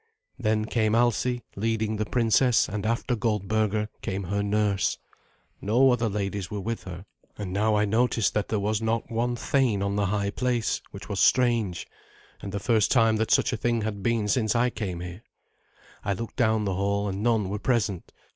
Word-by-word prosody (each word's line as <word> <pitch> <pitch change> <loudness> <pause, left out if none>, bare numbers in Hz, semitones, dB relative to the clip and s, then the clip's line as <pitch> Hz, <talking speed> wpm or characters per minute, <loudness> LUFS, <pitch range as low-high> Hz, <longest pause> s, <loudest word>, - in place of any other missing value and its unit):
Then 110 -2 +1
came 110 -1 +1
Alsi, 120 +1 +1
leading 110 +1 -1
the 110 0 -2
princess, 120 0 +3
and 105 +2 -3
after 115 +2 0
Goldberga 105 -1 0
came 95 +1 -3
her 100 +3 -1
nurse. 100 -1 +1 0.6
No 125 +6 +4
other 115 -2 +1
ladies 100 -2 -3
were 105 - -4
with 115 +4 -4
her; 90 0 -8 0.3
and 100 -3 -5
now 105 +2 +2
I 105 0 +3
noticed 115 0 +1
that 105 - -1
there 110 - -1
was 105 +2 -1
not 115 +1 -1
one 120 +2 0
thane 120 -5 +1
on 100 0 -1
the 100 -1 +1
high 100 0 -1
place, 125 0 -1
which - - -10
was - - -3
strange, 120 -7 +2 0.6
and 100 - -6
the 100 - -3
first 110 0 +2
time 115 -3 +4
that 110 +1 -1
such - - +3
a - - -1
thing 120 0 0
had 105 -2 -3
been 115 0 0
since 110 +2 +1
I 120 +1 +2
came 90 -7 -4
here. 90 +3 -7 0.8
I 100 - 0
looked 115 +4 -6
down 110 -3 +2
the 95 - 0
hall, 100 +2 0
and 95 0 -3
none 110 -3 +2
were 105 +1 -3
present. 105 -6 -1
110 Hz, 190 wpm, -26 LUFS, 100-115 Hz, 0.8 s, No